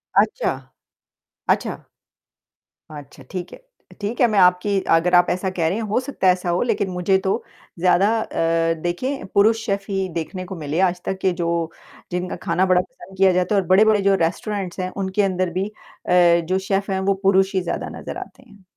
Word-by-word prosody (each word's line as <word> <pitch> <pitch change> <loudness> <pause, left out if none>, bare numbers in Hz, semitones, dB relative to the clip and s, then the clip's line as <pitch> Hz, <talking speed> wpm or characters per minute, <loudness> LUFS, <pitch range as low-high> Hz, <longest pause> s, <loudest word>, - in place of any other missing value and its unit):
अच्छा। 215 +2 +2 1.0
अच्छा। - - +1 1.2
अच्छा, 145 -2 -11
ठीक 180 -2 -5
है। - - -9 0.3
अ, - - -13
ठीक 215 +5 -3
है 240 - +6
मैं 200 - +3
आपकी 180 +2 +3 0.2
अगर 180 +2 +2
आप 175 0 +5
ऐसा 185 +2 -1
कह 170 -3 -1
रहे 185 - 0
हैं, 230 - -3
हो 215 +4 0
सकता 255 -8 -2
है 180 - +7
ऐसा 180 -1 -4
हो 175 - +1
लेकिन 200 -3 0
मुझे 180 +1 +1
तो 190 - +2 0.5
ज़्यादा 185 +2 +4
अ, 165 -3 0
देखें 255 +11 -3
पुरुष 220 +2 +3
शेफ़ 200 -1 -2
ही 190 -1 -1
देखने 185 +3 -6
को 190 - -7
मिले, 155 0 -3
आज 180 -1 +1
तक 190 - -2
के 190 - +2
जो 170 - 0 0.6
जिनका 180 +1 -3
खाना 180 +2 +2
बड़ा 185 -1 +3
पसंद 190 +1 -15
किया 190 -1 +5
जाता 180 +3 +1
है 200 - +4
और 180 - -10
बड़े-बड़े 210 +2 +5
जो 195 0 +3
रेस्टोरेंट्स 195 +1 -4
हैं 185 - -2
उनके 190 +2 0
अंदर 185 -2 0
भी 195 - -1
अ, - - -11 0.7
जो 185 +3 0
शेफ़ 195 0 0
हैं, 190 - 0
वो 195 +1 +1
पुरुष 195 0 +3
ही 190 - +2
ज़्यादा 175 - -4
नज़र - - -7
आते 265 - -10
हैं। 205 -2 -19
190 Hz, 200 wpm, -21 LUFS, 180-200 Hz, 1.2 s, है